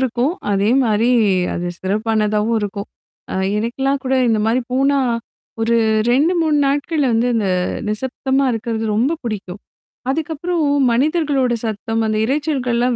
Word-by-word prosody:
இருக்கும். 260 +4 0 0.2
அதே 200 +2 +2
மாரி 225 0 +2 0.4
அது 175 0 -3
சிறப்பானதாவும் 215 +2 0
இருக்கும். 200 -1 -4 0.5
அ - - -3 0.2
எனக்கெல்லாம் 270 +5 -1
கூட 265 0 +1 0.2
இந்த 220 - +2
மாதிரி 240 +3 +1
போனா 275 +2 +2 0.6
ஒரு 230 +1 +2 0.5
2,3 325 -2 +2
நாட்கள 290 +3 0
வந்து 230 +2 +2
இந்த 220 -3 0 0.4
நிசப்தமா 265 +5 -1
இருக்கிறது 225 0 -3
ரொம்ப 240 +9 +1
பிடிக்கும். 205 -4 -5 0.5
அதுக்கப்பறம் 320 +3 -1 0.3
மனிதர்களோட 275 -1 +1
சத்தம் 225 +1 -2
அந்த 215 0 0
இரைச்சல்கள்லாம் 255 -3 0
240 Hz, 120 wpm, -19 LUFS, 220-275 Hz, 0.6 s, அதே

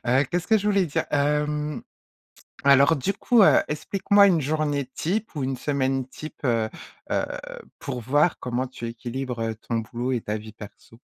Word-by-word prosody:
Heu, 130 +4 +3
qu'est-ce 175 0 -1
que 220 - +5
je 205 0 -2
voulais 200 -3 +3
dire? 145 - -1
Hem. 150 0 0 0.8
Alors 140 +3 +6
du 170 +9 -1
coup, 225 +1 +4
heu, - - +6
explique-moi 200 +6 +3
une 170 -5 +3
journée 145 -1 -1
type 200 +2 -2
ou 140 - -2
une 130 0 -1
semaine 135 -1 -1
type, 155 +4 -10
heu 115 -3 +1 0.4
heu, - - +1 0.5
pour 125 - -5
voir 145 +8 +2
comment 125 +1 -2
tu 120 -2 -7
équilibres, 120 +1 -5
heu, 115 -1 -2
ton 115 +1 -4
boulot 120 +3 -3
et 120 - -1
ta 105 +1 -3
vie 110 0 -10
perso. 110 +2 -13
140 Hz, 180 wpm, -25 LUFS, 120-155 Hz, 0.8 s, Alors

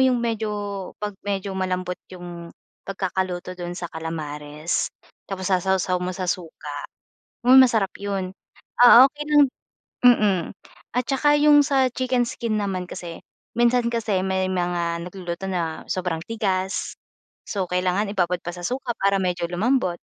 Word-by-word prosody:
'yung 255 -2 +3
medyo, 225 -2 -1 0.5
'pag 205 -1 -3
medyo 195 -1 -2
malambot 185 -1 -2
'yung 175 -2 -9 0.4
pagkakaluto 185 -2 -3
doon 175 0 -5
sa 175 - -4
kalamares 155 -1 -3 0.4
tapos 190 -1 -4
sasawsaw 185 -1 +1
mo 180 - -1
sa 185 0 -3
suka, 160 -4 -5 0.7
hmm, 260 +1 +9
masarap 220 -6 +2
'yun. 195 -2 -3 0.5
Ah, 245 +1 +10
okey 295 +2 -8
lang 295 -1 +6 0.6
mm. 205 -7 +5 0.5
At 250 - +2
tsaka 290 +2 +3
'yung 295 0 +7
sa 270 -2 +3
chicken 255 -1 +1
skin 230 -2 -2
naman 190 -3 -2
kasi, 170 -2 -7 0.4
minsan 240 0 +3
kasi 220 -5 0
may 190 0 0
mga 175 -2 -1
nagluluto 180 0 -6
na 165 -3 -3
sobrang 180 -3 -2
tigas. 195 -4 -2 0.5
So, 195 -3 -1
kailangan 180 +3 +1
ibabad 180 -2 +1
pa 175 - -5
sa 175 - -8
suka 255 -1 -2
para 195 0 +3
medyo 175 -1 -1
lumambot, 185 -1 +1
190 Hz, 140 wpm, -23 LUFS, 175-230 Hz, 0.7 s, Ah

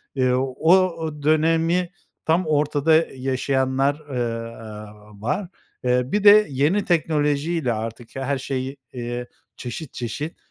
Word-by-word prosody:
Eee, 130 -2 +2
o 135 +6 +2
o 165 -5 -1
dönemi 165 +3 +2 0.4
tam 170 +3 +2
ortada 150 +2 +3
i 130 - -13
yaşayanlar, 135 +2 0
ııı, 120 -5 -3
aaa 105 -1 -11
var. 150 - -1 0.4
Eee, 125 0 +2
bir 210 0 +1
de 210 +1 +8
yeni 150 +10 +1
teknolojiyle 155 -3 +1
artık 115 +2 -6
her 135 +1 -1
şeyi, 135 +1 -4 0.2
eee, 120 0 -4 0.3
çeşit 125 +4 -7
çeşit, 145 +7 -5
140 Hz, 125 wpm, -23 LUFS, 125-160 Hz, 0.4 s, de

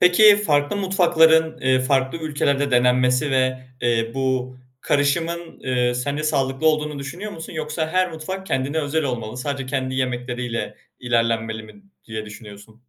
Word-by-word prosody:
Peki, 205 +4 +7
farklı 145 -3 +1
mutfakların, 165 -4 +3
eee, 130 0 +3
farklı 135 +4 +1
ülkelerde 145 -2 0
denenmesi 125 +3 +3
ve, 130 -1 +1 0.2
eee, 115 -1 +1
bu 130 -1 -1 0.2
karışımın, 165 +4 -1
eee, 125 -1 0
sence 140 +4 -2
sağlıklı 140 -1 0
olduğunu 150 -2 +1
düşünüyor 175 +10 -6
musun? 160 +1 -8
Yoksa 155 0 -3
her 185 +1 +1
mutfak 190 +5 -6
kendine 135 +4 -1
özel 150 +1 -1
olmalı, 120 -3 -4
sadece 135 0 -3
kendi 130 -1 -2
yemekleriyle 125 -2 -3 0.2
ilerlenmeli 115 -2 0
mi 200 - -15 0.2
diye 110 -1 -6
düşünüyorsun? 105 0 -12
135 Hz, 140 wpm, -22 LUFS, 125-160 Hz, 0.2 s, Peki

